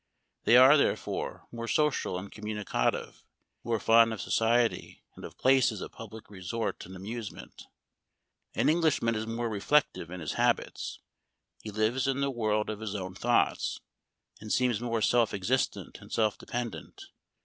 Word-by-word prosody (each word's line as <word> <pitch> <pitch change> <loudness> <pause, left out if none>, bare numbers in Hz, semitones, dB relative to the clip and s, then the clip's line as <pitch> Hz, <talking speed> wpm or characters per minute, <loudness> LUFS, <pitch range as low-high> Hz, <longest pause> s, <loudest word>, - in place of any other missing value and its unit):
They 120 - +7
are, 130 +4 +8
therefore, - - -1
more 115 0 -6
social 150 -10 +1
and 100 +2 -7
communicative; 105 - -2 0.4
more 115 -1 0
fond 115 +1 +5
of 110 - -6
society, 115 +1 0
and - - -12
of - - -9
places 130 -5 +3
of - - -7
public 110 0 -10
resort 105 +4 -4
and 95 - -10
amusement. 105 +3 -8 0.9
An - - +2
Englishman 155 -8 +2
is 110 0 -3
more 115 +1 -2
reflective 110 - +1
in 90 +1 -7
his 80 -3 -4
habits. - - 0 0.6
He 110 - -7
lives 110 +5 0
in 135 0 0
the 140 0 0
world 110 -3 0
of 110 -1 -4
his 110 -2 -5
own 95 -2 -4
thoughts, 120 +5 +1 0.6
and 110 0 -7
seems 125 -4 +2
more 115 -2 -1
self 120 -3 +3
existent 115 +7 -1
and - - -14
self 110 -2 +1
depend 120 -2 -4
ent. - - -13
115 Hz, 155 wpm, -29 LUFS, 105-120 Hz, 0.9 s, are